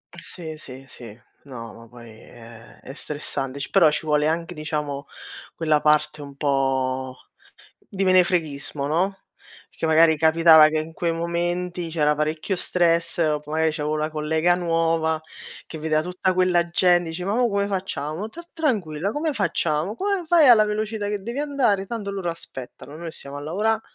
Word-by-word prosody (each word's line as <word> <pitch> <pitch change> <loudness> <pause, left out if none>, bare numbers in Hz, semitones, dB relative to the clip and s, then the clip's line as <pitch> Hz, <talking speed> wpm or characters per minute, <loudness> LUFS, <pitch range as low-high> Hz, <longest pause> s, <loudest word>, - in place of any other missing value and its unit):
Sì, 170 -2 -9
sì, 135 -2 -11
sì, 115 -3 -12 0.2
no, 120 -5 -9
ma 115 0 -14
poi 120 -1 -13
è 115 +1 -15
è 135 - -10
stressante, 140 -2 -5
ci 140 - -5
però 170 -6 +5
ci 150 - -3
vuole 150 -1 +2
anche 165 +2 -2
diciamo, 150 -2 -4 0.5
quella 155 -2 +1
parte 150 0 +2
un 140 -1 -10
po' 130 -2 0 0.6
di 195 -1 -6
menefreghismo, 170 -7 +1
no, 185 +6 0 0.5
perché - - -4
magari 160 0 +5
capitava 160 0 +7
che 155 0 -1
in 155 +1 -5
quei 170 +1 -1
momenti 175 +1 -2
c'era 150 -2 +1
parecchio 155 +5 -1
stress 170 -1 0
o 155 -3 +2
p 150 - -25
magari 160 +1 +1
c'avevo 150 -1 -2
la 155 +1 -2
collega 160 +3 +1
nuova 165 -2 0 0.4
che 160 - -8
vedeva 155 0 0
tutta 180 +2 -1
quella 180 -1 +3
gente, 175 -1 +2
dice: 175 +2 -5
"Ma 200 +2 -1
mo 245 +1 +2
come 200 -1 0
facciamo? 185 -1 -4
Ta 340 +10 -11
tranquilla, 200 - -1
come 305 +3 -1
facciamo, 170 - -1
come 395 - -1
fai 320 -3 +5
alla 225 -3 +7
velocità 210 0 -2
che 205 -1 -3
devi 235 +6 -5
andare 270 -10 +1
tanto 210 -2 -4
loro 195 -3 -4
aspettano, 140 -3 -10
noi 165 0 -7
stiamo 140 -3 -10
a - - -6
lavora'," 200 +10 0
ho 220 - -7
165 Hz, 170 wpm, -23 LUFS, 150-185 Hz, 0.6 s, capitava